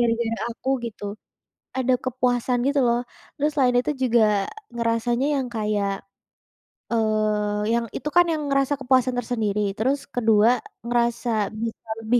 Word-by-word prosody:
gara-gara 230 -1 +1 0.2
aku 260 - -7 0.2
gitu, 215 -3 -7 0.7
ada 255 0 +2
kepuasan 250 -1 0
gitu 280 +1 +2
loh 235 0 +2 0.4
terus 295 +1 0
selain 255 -4 +3
itu 250 +4 +1
juga 240 -3 +4 0.5
ngerasanya 235 +2 0
yang 265 - -1
kayak 210 -2 0 1.0
eee, 215 -1 +1
yang 235 0 +1
itu 300 - -3
kan 350 0 +7
yang 310 - -2
merasa 275 0 +2
kepuasan 255 -1 +2
tersendiri, 220 -4 -1 0.2
terus 275 +5 0
kedua 225 0 +4 0.3
ngerasa 235 -3 0
bisa 225 +1 -4 0.3
lebih 240 +2 +3
235 Hz, 135 wpm, -24 LUFS, 220-255 Hz, 1.0 s, kan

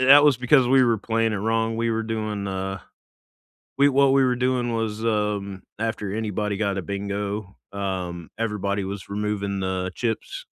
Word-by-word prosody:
that 140 +3 +8
was 145 -4 +5
because 125 +2 +4
we 130 +1 +5
were 115 -3 +3
playing 115 +1 0
it - - -1
wrong, 115 +2 0
we 115 0 0
were 115 0 0
doing, 110 -2 -3
uh 95 0 -3 1.0
we 140 +1 +6
what 140 0 +4
we 135 -1 +5
were 125 -1 +2
doing 125 -1 0
was, 110 -1 -2
um, 105 -3 -1 0.2
after 110 -3 -2
anybody 105 -1 -2
got 100 -2 0
a 95 - -1
bingo, 100 +2 -4 0.2
um, 90 -4 -4
everybody 105 -3 -1
was 95 +1 -6
removing 100 -1 -2
the 95 0 -1
chips, 115 -2 -3
105 Hz, 170 wpm, -24 LUFS, 100-115 Hz, 1.0 s, that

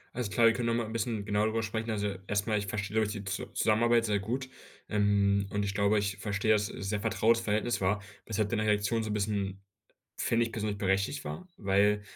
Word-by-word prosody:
Alles 120 -4 -2
klar, 115 +4 +3
wir 115 - +7
können 120 0 -2
noch 115 - +2
mal 120 -1 0
'n 110 - -7
bisschen 110 -2 -2
genauer 105 +1 +1
darüber 110 +1 0
sprechen. 110 +1 -3
Also, 105 -2 -1
erstmal, 105 +1 +1
ich 105 - -5
verstehe, 105 0 -3
glaube 110 -1 +2
ich, 105 - -3
die 105 -2 -6
Zu 100 -1 -4
Zusammenarbeit 115 +1 +3
sehr 105 -1 +1
gut. 125 +6 -3 0.4
Ähm, 100 -1 +2
und 100 +1 -1
ich 100 - -2
glaube, 100 +1 +2
ich 100 -2 -1
verstehe, 100 +1 0
dass 105 -1 +3
sehr 100 +1 -3
vertrautes 115 +3 +2
Verhältnis 110 +1 0
war, 100 +3 +2 0.3
weshalb 110 -1 0
deine 110 -2 0
Reaktion 105 +1 +1
so 110 - -4
'n - - -1
bisschen, 100 -2 -2 0.5
finde 115 0 +2
ich 115 - -6
persönlich, 105 -2 -3
berechtigt 95 +8 0
war. 185 - -6
Weil 105 +1 +2
105 Hz, 220 wpm, -30 LUFS, 100-110 Hz, 0.5 s, wir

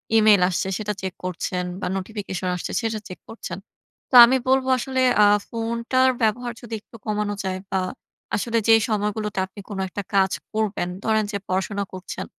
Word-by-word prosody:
Email 215 -3 +6
আসছে 185 +1 -1
সেটা 210 -1 -2
check 190 -1 -4
করছেন 180 0 -2 0.2
বা - - -1
নোটিফিকেশন 195 -2 -4
আসছে 180 - -5
সেটা 225 -1 -2
চেক 185 - -9
করছেন। 185 -6 -7 0.5
তো - - 0
আমি 260 +2 +3
বলবো 265 0 +3
আসলে 260 +1 -1 0.2
আ - - +8 0.2
ফোনটার 235 +3 +1
ব্যবহার 235 +2 +1
যদি 230 -1 -9
একটু - - -18
কমানো 210 -1 -1
যায় 185 0 -2
বা 190 - +1 0.6
আসলে 230 +2 -1
যেই 225 -1 +7
সময়গুলোতে 210 -1 -1
আপনি 190 +2 -14
কোন 205 - -5
একটা 205 - -4
কাজ 190 -1 +4 0.2
করবেন, 215 -4 -1 0.2
ধরেন 220 -1 +2
যে 200 - -1
পড়াশোনা 195 +2 -1
করছেন। 185 0 -6
210 Hz, 170 wpm, -23 LUFS, 190-230 Hz, 0.6 s, আ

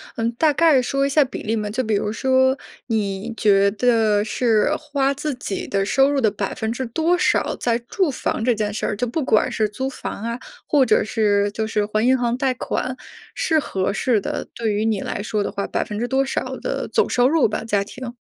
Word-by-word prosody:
嗯， 230 -1 -1
大 300 +4 +2
概 310 -4 +4
说 275 +2 0
一 - - 0
下 285 0 +4
比 - - -7
例 225 +1 -1
吗？ 210 -1 -2
就 255 +5 -1
比 215 -2 0
如 210 +1 -1
说， 260 +2 +2 0.3
你 215 0 -2
觉 200 -2 +4
得 220 -2 +2
是 225 +4 +1
花 280 -3 0
自 290 +1 -3
己 205 -5 -5
的 195 -1 0
收 270 +6 +3
入 280 -2 +1
的 220 - +4
百 200 -1 -3
分 220 0 -2
之 255 +2 -3
多 325 +9 +1
少， - - +1
在 235 -1 +1
住 305 +8 -1
房 240 -3 -2
这 245 - +4
件 210 -1 -2
事 - - -3
儿 210 - -1
就 245 +4 -1
不 270 +5 -2
管 215 - +2
是 215 -1 +1
租 260 +6 -4
房 225 -4 -6
啊， 235 +1 -3 0.3
或 280 -3 +4
者 - - +3
是 205 -2 +1
就 220 +1 -2
是 210 -1 0
还 215 +2 0
银 260 0 +4
行 240 0 0
贷 260 -1 +1
款， 255 +1 -3 0.4
是 320 -3 +2
合 190 -8 -2
适 215 0 +1
的。 - - -4
对 225 -3 -1
于 215 +2 0
你 215 -3 0
来 200 - -4
说 210 -1 -1
的 - - -3
话， 200 - -3
百 - - -1
分 210 0 -6
之 240 - -1
多 270 +1 +2
少 265 - -3
的 - - -3
总 - - +1
收 245 +1 +3
入 300 -6 +3
吧 215 - -3
家 205 -3 +1
庭。 245 +3 -8
235 Hz, 250 characters per minute, -21 LUFS, 210-265 Hz, 0.4 s, 概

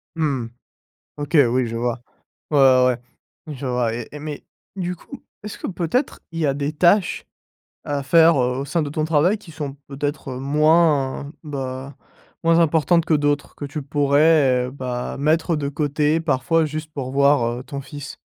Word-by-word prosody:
Mmh. 140 -7 -1 0.7
OK, 145 +2 0
oui, 125 +1 +1
je 115 0 -5
vois. 120 0 -2 0.5
Ouais, 150 - +2
ouais, 130 -2 +5 0.5
ouais, 155 - -6
je 135 0 -6
vois 125 -2 0
et 120 -1 -6
et 150 - -7
mais, 150 -1 -7 0.3
du 180 -1 -3
coup, - - -12 0.2
est-ce 210 - -7
que - - -5
peut-être, 180 - -1
il 165 - -5
y 155 - +2
a 140 - +1
des 145 +1 -2
tâches 180 +4 +2 0.6
à 145 -1 -2
faire, 165 +4 +5
heu, 125 +1 0
au 140 - -3
sein 165 +4 0
de 145 - -2
ton 155 +1 -1
travail, 165 +6 +2
qui 190 -5 -14
sont 145 -3 -6
peut-être 140 -1 -4
moins, 145 0 +2
bah, 135 -2 -5 0.5
moins 165 0 +4
importantes 165 +1 +3
que - - +1
d'autres, 145 -1 0
que - - -9
tu 145 +2 -5
pourrais, 140 -2 +3
heu, - - -7
bah, 125 -2 -4
mettre 160 +4 +1
de 140 -2 -2
côté, 150 +2 0
parfois, 160 +1 +1
juste 155 +1 -5
pour 130 -3 -4
voir, 140 -2 +3
heu, - - -9
ton 140 0 -6
fils? 145 +1 -9
145 Hz, 180 wpm, -21 LUFS, 135-160 Hz, 0.7 s, ouais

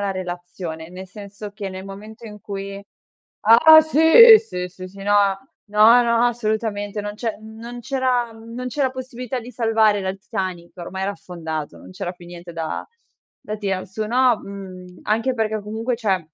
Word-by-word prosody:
la 200 -1 -1
relazione. 175 -3 -6
Nel 185 +2 -9
senso 200 +2 -10
che, 205 -1 -6
nel 185 0 -8
momento 215 +4 -11
in 210 -1 -11
cui 200 0 -6 0.6
ah, 240 +9 +9
sì! 320 - +8
Sì, 180 -1 -5
sì, 185 0 -10
sì! 195 +2 -16
No, 205 0 +2 0.5
no, 215 +4 +6
no, 235 0 +2
assolutamente. 215 -3 -2
Non 205 0 -5
c'è 225 0 -3
non 225 +2 -9
c'era 250 -2 -1
mhmm, 225 +1 -12
non 250 +1 -5
c'era 260 +1 0
possibilità 255 -1 -6
di 245 +1 -9
salvare 220 -3 +2
la 190 - -3
il 190 +1 -4
Titanic. 185 -4 -5
Ormai 190 +2 -6
era 200 +1 -1
affondato, 160 -5 -6
non - - -13
c'era 185 -1 -4
più 175 -1 -15
niente 175 0 -10
da 165 -1 -4 0.6
da 215 +1 -5
tirar 195 -3 -3
su 195 +3 -4
no, 245 0 +3
mhmm, 185 -2 -10
anche 225 +5 0
perché 220 -1 -1
comunque, 225 +4 -3
cioè, 200 -6 0
210 Hz, 175 wpm, -21 LUFS, 190-235 Hz, 0.6 s, ah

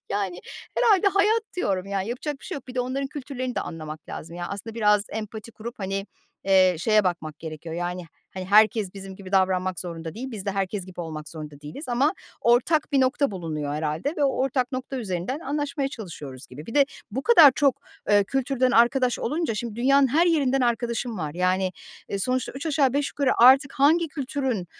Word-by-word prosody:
Yani 195 -3 -2 0.4
herhâlde 410 -5 +4
hayat 420 +3 +3
diyorum. 195 - -1
Ya 200 -1 -1
yapacak 265 +6 -4
bir - - -15
şey 375 - -5
yok. 270 - -10
Bir 250 - -8
de 250 - +1
onların 265 +2 -2
kültürlerini 255 -3 -5
de - - -1
anlamak 155 -1 -7
lazım. 170 +2 -7
Yani 175 0 -4
aslında 210 +3 -6
biraz 210 -2 +3
empati 220 +1 -6
kurup, 235 +2 -8
hani, 195 +1 -3 0.4
eee, 185 -2 +5
şeye 215 +3 +3
bakmak 160 -4 -2
gerekiyor 160 0 -7
yani, 175 +1 -3 0.3
hani 185 - -4
herkes 210 0 +4
bizim 195 -1 -9
gibi 190 -1 -11
davranmak 185 -1 +1
zorunda 165 -1 -6
değil. 260 +3 -6
Biz 205 -3 -7
de - - +1
herkes 195 -1 -2
gibi 180 -1 -8
olmak 155 -3 -6
zorunda 150 -3 -9
değiliz 150 - -8
ama 265 +8 +2 0.3
ortak 270 +7 +2
bir 275 - +4
nokta 260 0 +2
bulunuyor 155 -6 -4
herhâlde 155 - -2
ve 290 - +2
o - - +4
ortak 260 -1 0
nokta 260 +1 -4
üzerinden 210 - -3
anlaşmaya 285 -1 -2
çalışıyoruz 160 - -9
gibi. 145 +5 -11
Bir 230 - -8
de 285 -1 +6 0.3
bu 260 +6 -3
kadar 325 - +8
çok, 280 -3 +3 0.3
eee, 205 -1 +5
kültürden 260 +1 0
arkadaş 245 +1 +3
olunca 305 -1 -1
şimdi 220 0 -5
dünyanın 275 +3 +4
her 325 +7 +3
yerinden 275 -6 +2
arkadaşım 235 -2 -1
var. 150 -1 -4
Yani, 185 +1 +1 0.4
eee, 200 - -2
sonuçta 255 +4 -1
üç 275 +5 -6
aşağı 280 -4 +2
beş 285 0 0
yukarı 280 -2 +1
artık 270 +2 +7
hangi 310 +4 +3
kültürün 265 - -2
230 Hz, 195 wpm, -25 LUFS, 185-270 Hz, 0.4 s, kadar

